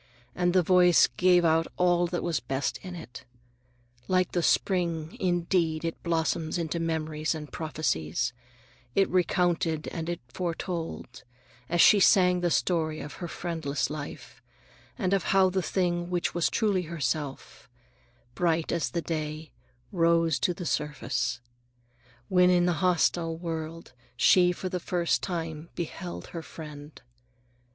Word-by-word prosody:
And 175 0 +1
the 185 -1 +4
voice 180 0 +6
gave 180 -1 +4
out 165 0 +3
all 175 -1 +3
that 175 0 -3
was 170 -3 0
best 135 +4 -2
in 185 -2 -8
it. 160 -7 -10 0.8
Like 185 -1 +2
the 175 - 0
spring, 170 -3 0
indeed, 170 -3 0
it 165 - -4
blossomed 165 -1 -1
into 170 0 -2
memories 160 -1 -1
and 150 -2 -8
prophecies, 125 - -2 0.6
it 195 - +4
recounted 175 -3 +1
and 165 0 -5
it 175 - -3
foretold, 165 -5 -5 0.5
as 175 0 +3
she 210 - +7
sang 180 -2 +5
the 175 - +1
story 160 -3 0
of 145 - -7
her 175 - -3
friendless 160 -5 -3
life, 150 -1 -8 0.6
and 195 -5 0
of 195 -3 +1
how 190 -1 +4
the 190 0 0
thing 175 -1 -1
which 175 -1 -1
was 175 -1 +1
truly 205 -5 +1
herself, 145 -5 -4 0.6
"bright 165 +1 0
as 170 - 0
the 170 -1 -3
day, 155 -1 -4 0.4
rose 165 -2 +2
to - - +1
the 180 - -6
surface" 145 -6 -2 0.9
when 180 -1 +4
in 175 -1 +4
the 175 - +2
hostile 170 -2 +1
world 165 -2 -6 0.2
she 180 +6 +5
for 180 +1 -5
the 180 0 -3
first 170 -5 0
time 165 -3 -4
beheld 175 +1 -5
her 165 - -6
Friend. 150 -2 -10
170 Hz, 140 wpm, -28 LUFS, 155-180 Hz, 0.9 s, she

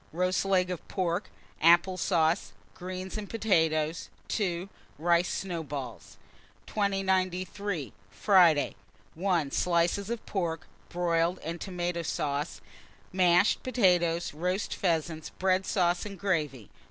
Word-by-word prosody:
Roast 185 +3 0
leg 185 -2 +2
of 180 - -6
pork, 180 0 -2 0.3
apple 170 +3 +5
sauce, 170 -1 +1 0.2
greens, 185 +2 -6
and 205 - -7
potatoes. 160 -7 +1 0.2
2. 180 -3 -1 0.3
Rice 170 +3 +2
snowballs. 145 - -5 0.5
2093. 190 - -1 0.2
Friday. 175 - +4 0.4
1. 170 -5 0
Slices 175 +3 +1
of 235 -1 -4
pork, 170 -3 -2 0.2
broiled, 170 0 +1
and 170 +2 -4
tomata 175 -2 -3
sauce, 145 0 -2 0.5
mashed 180 +1 +4
potatoes; 175 -10 +2
roast 180 +6 -2
pheasants, 160 -3 -1
bread 185 0 +1
sauce, 175 -3 +1
and 200 -2 -7
gravy. 150 - -2
175 Hz, 105 wpm, -29 LUFS, 165-190 Hz, 0.5 s, apple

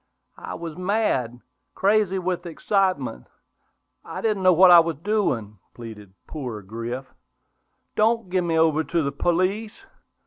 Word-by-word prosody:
"I - - -7
was 165 -2 -7
mad, 180 - -1 0.3
crazy 200 -1 +2
with 180 -1 -3
excitement; 170 - -1 0.8
I - - -7
didn't 215 -3 0
know 185 0 +5
what 180 +1 +7
I 175 - +10
was 165 -2 0
doing," 135 - -1 0.2
pleaded 110 -4 -10
"poor 125 -8 -6
Griff." 115 +6 -6 0.9
"Don't 220 -3 +1
give 185 -1 +1
me 165 -1 0
over 160 -1 +3
to 165 0 -1
the 140 - -1
police! 185 +8 -1
170 Hz, 135 wpm, -24 LUFS, 130-195 Hz, 0.9 s, I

